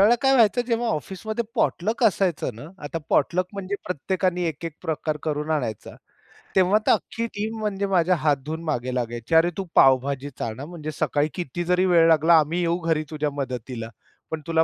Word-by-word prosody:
वेळेला 215 Hz, +4 st, +6 dB
काय 270 Hz, 0 st, +4 dB
व्हायचं, 240 Hz, -1 st, +4 dB
जेव्हा 235 Hz, 0 st, 0 dB
ऑफिसमध्ये 220 Hz, +5 st, -3 dB
पॉटलक 220 Hz, 0 st, 0 dB
असायचं 185 Hz, -, +1 dB
ना. 115 Hz, +6 st, -10 dB, 0.2 s
आता 155 Hz, +3 st, -3 dB
पॉटलक 180 Hz, +5 st, +2 dB
म्हणजे 200 Hz, 0 st, -4 dB
प्रत्येकाने 180 Hz, +2 st, -1 dB
एक-एक 160 Hz, +1 st, -5 dB
प्रकार 155 Hz, -2 st, -2 dB
करून 150 Hz, 0 st, -2 dB
आणायचा. 125 Hz, -9 st, -2 dB, 0.6 s
तेव्हा 190 Hz, +2 st, +5 dB
तर -, -, +6 dB
अख्खी 230 Hz, -, 0 dB
टीम 215 Hz, +2 st, -3 dB
म्हणजे 200 Hz, -2 st, -1 dB
माझ्या 180 Hz, -2 st, +3 dB
हात 150 Hz, -3 st, +2 dB
धुऊन 160 Hz, +2 st, -4 dB
मागे 130 Hz, -5 st, -2 dB
लागायची, 120 Hz, +4 st, -2 dB
"अरे, 165 Hz, +2 st, +6 dB
तू 195 Hz, -, -3 dB
पावभाजीच 135 Hz, +1 st, +3 dB
आण, 110 Hz, 0 st, -3 dB
हां. 145 Hz, -, -6 dB
म्हणजे 155 Hz, -3 st, -6 dB
सकाळी 150 Hz, 0 st, 0 dB
किती 175 Hz, 0 st, -4 dB
जरी 180 Hz, +2 st, +2 dB
वेळ 170 Hz, -2 st, +5 dB
लागला. 160 Hz, +1 st, +6 dB
आम्ही 155 Hz, +3 st, 0 dB
येऊ 170 Hz, 0 st, +1 dB
घरी 160 Hz, -2 st, +1 dB
तुझ्या 150 Hz, -1 st, -1 dB
मदतीला. 125 Hz, -4 st, -5 dB, 0.4 s
पण 160 Hz, -1 st, -3 dB
तुला 165 Hz, -1 st, +3 dB
165 Hz, 180 wpm, -24 LUFS, 145-190 Hz, 0.6 s, वेळेला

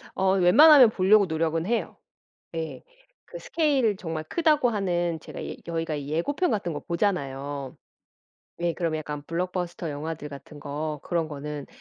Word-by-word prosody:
어 190 Hz, 0 st, +2 dB
웬만하면 255 Hz, -, +8 dB
볼려고 200 Hz, 0 st, +4 dB
노력은 165 Hz, 0 st, -1 dB
해요. 235 Hz, +2 st, -1 dB, 0.6 s
예 160 Hz, -1 st, -5 dB, 0.4 s
그 -, -, -9 dB
스케일 275 Hz, -, +1 dB
정말 165 Hz, -4 st, -4 dB
크다고 300 Hz, -, +2 dB
하는 175 Hz, -6 st, -1 dB
제가 -, -, -8 dB
예 -, -, -5 dB
저희가 165 Hz, -2 st, -2 dB
이 145 Hz, -1 st, -6 dB
예고편 280 Hz, -, 0 dB
같은 195 Hz, -5 st, -1 dB
거 145 Hz, -, -4 dB
보잖아요. 140 Hz, -7 st, -2 dB, 0.9 s
예 170 Hz, -1 st, +1 dB
그럼 165 Hz, -1 st, -1 dB
약간 150 Hz, -1 st, -5 dB
블록버스터 175 Hz, -1 st, -3 dB
영화들 150 Hz, +1 st, -5 dB
같은 145 Hz, +1 st, -11 dB
거 150 Hz, +1 st, -4 dB
그런 170 Hz, -2 st, -1 dB
거는 150 Hz, -1 st, -6 dB
170 Hz, 315 characters per minute, -26 LUFS, 150-200 Hz, 0.9 s, 웬만하면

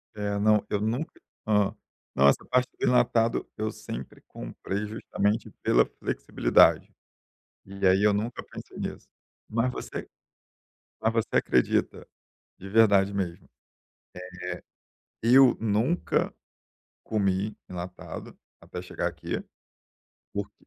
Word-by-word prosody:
É, 100 Hz, -1 st, -2 dB
não. 105 Hz, 0 st, +4 dB
Eu 105 Hz, -1 st, 0 dB
nunca 120 Hz, +8 st, -2 dB, 0.3 s
hã, 105 Hz, -2 st, +3 dB, 0.4 s
não, 70 Hz, +1 st, +5 dB
essa 70 Hz, -, +3 dB
parte 125 Hz, 0 st, +3 dB
de -, -, -1 dB
enlatado, 120 Hz, -2 st, +3 dB
eu 110 Hz, 0 st, -1 dB
sempre 65 Hz, +1 st, -8 dB
comprei, 95 Hz, +12 st, -5 dB
justamente 105 Hz, 0 st, -1 dB
pela 60 Hz, +1 st, +5 dB
flexibilidade. -, -, +2 dB, 0.7 s
E 100 Hz, 0 st, -4 dB
aí 95 Hz, +2 st, +4 dB
eu 105 Hz, -, +5 dB
nunca 110 Hz, +4 st, -2 dB
pensei -, -, -11 dB
nisso. -, -, -5 dB, 0.4 s
Mas 115 Hz, +3 st, +1 dB
você -, -, -6 dB, 1.0 s
mas 110 Hz, -, +3 dB
você 115 Hz, -1 st, +1 dB
acredita, 60 Hz, -, +1 dB, 0.5 s
de 95 Hz, -, -9 dB
verdade 100 Hz, -2 st, +4 dB
mesmo, 90 Hz, -4 st, -3 dB, 1.8 s
eh, 115 Hz, -, 0 dB
eu 135 Hz, -2 st, +8 dB
nunca 115 Hz, -, +1 dB, 0.7 s
comi 100 Hz, 0 st, 0 dB
enlatado 90 Hz, 0 st, -8 dB, 0.2 s
até -, -, -7 dB
chegar -, -, -2 dB
aqui. -, -, -5 dB, 0.9 s
Porque -, -, -6 dB
105 Hz, 115 wpm, -27 LUFS, 95-115 Hz, 1.8 s, eu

